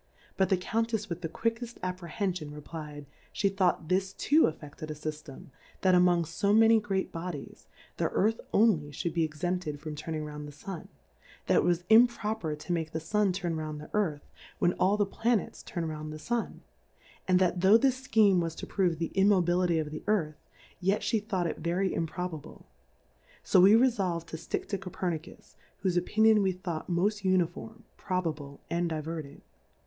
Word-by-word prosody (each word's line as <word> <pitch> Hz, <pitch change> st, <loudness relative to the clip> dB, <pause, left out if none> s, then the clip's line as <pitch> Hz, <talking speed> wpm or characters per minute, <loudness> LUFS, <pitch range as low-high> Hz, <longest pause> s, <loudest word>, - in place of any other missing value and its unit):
But 190 Hz, -, +2 dB
the 190 Hz, -, +3 dB
Cotintep 220 Hz, +2 st, -1 dB
with 170 Hz, 0 st, -4 dB
the 165 Hz, -, -3 dB
quick 230 Hz, +6 st, -1 dB
eft 240 Hz, 0 st, -8 dB
Apprehenfion, 180 Hz, -3 st, -3 dB
replfd^ 150 Hz, -1 st, -8 dB, 0.3 s
fhe 195 Hz, -1 st, +1 dB
thought 180 Hz, -4 st, +1 dB
this 190 Hz, +2 st, 0 dB
tooafFeded 155 Hz, -, +1 dB
a 155 Hz, -, -4 dB
Syftem, 150 Hz, -2 st, -7 dB, 0.3 s
that 185 Hz, -1 st, +4 dB
among 180 Hz, -1 st, +4 dB
fo 200 Hz, +6 st, 0 dB
many 225 Hz, +1 st, +6 dB
great 195 Hz, -2 st, -2 dB
Bodies, 165 Hz, -4 st, -7 dB, 0.3 s
the -, -, 0 dB
Earth 220 Hz, +3 st, +1 dB
only 200 Hz, -9 st, +3 dB
fliould 160 Hz, +3 st, -3 dB
be 165 Hz, -1 st, +1 dB
exempted 155 Hz, 0 st, -2 dB
from 155 Hz, 0 st, -6 dB
turning 155 Hz, +1 st, -4 dB
round 150 Hz, 0 st, -7 dB
the -, -, -9 dB
Sun; 160 Hz, +4 st, -8 dB, 0.6 s
that -, -, +3 dB
it -, -, +4 dB
was 175 Hz, +1 st, +1 dB
improper 220 Hz, -7 st, +3 dB
to 155 Hz, +4 st, -4 dB
make 160 Hz, -2 st, -2 dB
the 160 Hz, -, -1 dB
Sun 200 Hz, +5 st, +1 dB
turn 175 Hz, -3 st, -2 dB
round 155 Hz, -1 st, -4 dB
the 150 Hz, -, -11 dB
Earthy 170 Hz, -9 st, 0 dB, 0.3 s
when 175 Hz, -, +2 dB
all 195 Hz, +3 st, +2 dB
the 205 Hz, -, +2 dB
Tlanets 225 Hz, +2 st, -1 dB
turn 170 Hz, -2 st, -4 dB
round 155 Hz, -1 st, -5 dB
the 155 Hz, -, -6 dB
Sun; 235 Hz, +9 st, -3 dB, 0.6 s
and 185 Hz, -1 st, +4 dB
that 180 Hz, -1 st, +1 dB
tho' 195 Hz, +4 st, +7 dB
this 260 Hz, +1 st, +1 dB
Scheme 210 Hz, -7 st, +4 dB
was 165 Hz, -1 st, -2 dB
to -, -, -6 dB
prove 180 Hz, -4 st, 0 dB
the 165 Hz, +1 st, -3 dB
Immobility 180 Hz, -3 st, +3 dB
of 155 Hz, -2 st, -2 dB
the 155 Hz, -, -6 dB
Earthy 180 Hz, -8 st, +1 dB, 0.5 s
yet 195 Hz, +3 st, +1 dB
flie 225 Hz, -, +1 dB
thought 200 Hz, -4 st, -2 dB
it 165 Hz, -, -3 dB
very 175 Hz, +4 st, 0 dB
improbable: 165 Hz, -1 st, -5 dB, 0.8 s
So 185 Hz, -, +5 dB
we 200 Hz, +4 st, +8 dB
re 250 Hz, +3 st, +6 dB
folvM 180 Hz, -8 st, -2 dB
to 160 Hz, -, -7 dB
ftick -, -, -4 dB
to 200 Hz, -, -2 dB
Ccfernkus^ 175 Hz, -3 st, -5 dB, 0.3 s
whofe 180 Hz, -2 st, +2 dB
Opi 180 Hz, -, -13 dB
nion 220 Hz, -1 st, +6 dB
we 190 Hz, -1 st, +1 dB
thought 175 Hz, -3 st, -5 dB
moft 200 Hz, +4 st, 0 dB
Uniform, 185 Hz, +5 st, -1 dB
Pro 185 Hz, -2 st, -1 dB
bable, 145 Hz, -4 st, -5 dB
and 170 Hz, 0 st, -1 dB
Diverting. 155 Hz, -2 st, -5 dB
180 Hz, 180 wpm, -29 LUFS, 160-200 Hz, 0.8 s, we